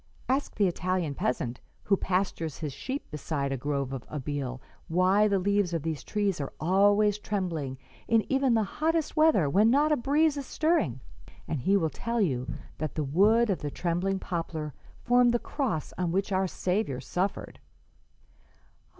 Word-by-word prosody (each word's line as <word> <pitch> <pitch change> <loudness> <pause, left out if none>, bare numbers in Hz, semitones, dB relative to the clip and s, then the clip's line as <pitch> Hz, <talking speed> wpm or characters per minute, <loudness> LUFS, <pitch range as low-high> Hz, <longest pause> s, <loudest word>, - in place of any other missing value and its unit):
Ask 270 +3 0
the 205 -2 +3
Italian 180 -3 -1
peasant 125 -2 -2 0.2
who 200 - +3
pastures 180 -6 -1
his 150 -4 -4
sheep 265 - -5
beside 145 -1 -2
a - - 0
grove 140 0 -2
of 130 -2 -5
Abele 140 -3 -4 0.3
why 185 +5 +3
the 200 -1 +2
leaves 200 -1 +1
of 160 - -2
these 160 -2 -3
trees 200 -6 -1
are 140 - -4
always 205 +4 +3
trembling 170 -11 -3 0.3
in 225 -1 +3
even 270 -3 +2
the 220 - +3
hottest 320 +9 -1
weather 310 - +4
when 205 +10 +4
not 290 +5 +3
a - - +5
breeze 295 +4 +2
is 280 - -5
stirring, 310 - +1 0.5
and 155 - -2
he 195 +9 +3
will 160 -5 0
tell 235 0 -2
you 130 - 0 0.3
that 155 -1 -3
the 155 - 0
wood 205 +10 +4
of 185 - -1
the 145 - -3
trembling 180 +5 -1
poplar 165 -5 -4 0.3
formed 245 0 +4
the - - +5
cross 235 - -3
on 175 -2 0
which 195 +3 0
our 190 0 +2
Saviour 180 - -1
suffered.'" 180 +9 -3
185 Hz, 165 wpm, -28 LUFS, 150-220 Hz, 0.5 s, a